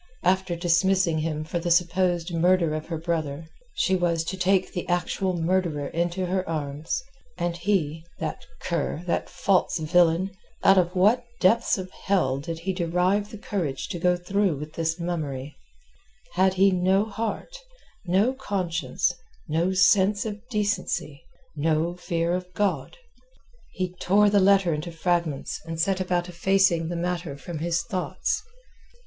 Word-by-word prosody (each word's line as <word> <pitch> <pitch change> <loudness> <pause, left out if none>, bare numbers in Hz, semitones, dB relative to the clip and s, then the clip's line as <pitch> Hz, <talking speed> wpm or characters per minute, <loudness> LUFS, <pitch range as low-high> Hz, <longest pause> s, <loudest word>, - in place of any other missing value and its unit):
After 185 0 +2
dismissing 175 0 +2
him 155 -1 -2
for 165 +2 -3
the 175 +1 -2
supposed 175 0 +2
murder 170 -1 +3
of 155 0 -4
her 165 -1 -3
brother, 160 -2 -3 0.3
she 190 - +2
was 170 -2 +1
to 180 +3 -4
take 185 0 +1
the 175 - -4
actual 180 +1 0
murderer 165 -4 0
to 175 +2 -1
her 185 -1 -1
arms. 150 - -3 0.3
And 175 -1 -1
he, 170 -4 0
that 160 -1 -4 0.2
cur, 170 -1 -2
that 175 - -1
false 180 +1 +1
villain!—out 175 +4 +2
of 180 0 0
what 210 +7 +4 0.2
depths 225 +5 +3
of 185 -1 -6
hell 170 -12 0
did 165 +3 -6
he 190 +2 -1
derive 180 +4 +1
the 215 - -8
courage 175 -10 -3
to 175 - -4
go 180 +1 +3
through 190 -2 0
with 150 +2 -7
this 165 +1 -1
mummery?—had 150 - -4
he 195 +1 +5
no 190 +3 +2
heart, 220 - -4 0.5
no 195 +7 +2
conscience, 185 -9 -1 0.3
no 165 +4 +1
sense 190 +3 +4
of 210 -1 -5
decency, 205 - -1 0.3
no 160 +3 0
fear 170 -1 -1
of 180 0 -3
God? 205 - -1 0.8
He 185 -1 -3
tore 205 +2 +4
the 205 - +5
letter 195 -3 +4
into 155 +3 -4
fragments 165 -3 -1
and 165 0 -5
set 190 +2 +1
about 180 -1 0
effacing 180 -2 +2
the 175 - -3
matter 170 -4 -3
from 155 +3 -7
his 165 +1 0
thoughts. 190 - -2
175 Hz, 145 wpm, -25 LUFS, 165-190 Hz, 0.8 s, he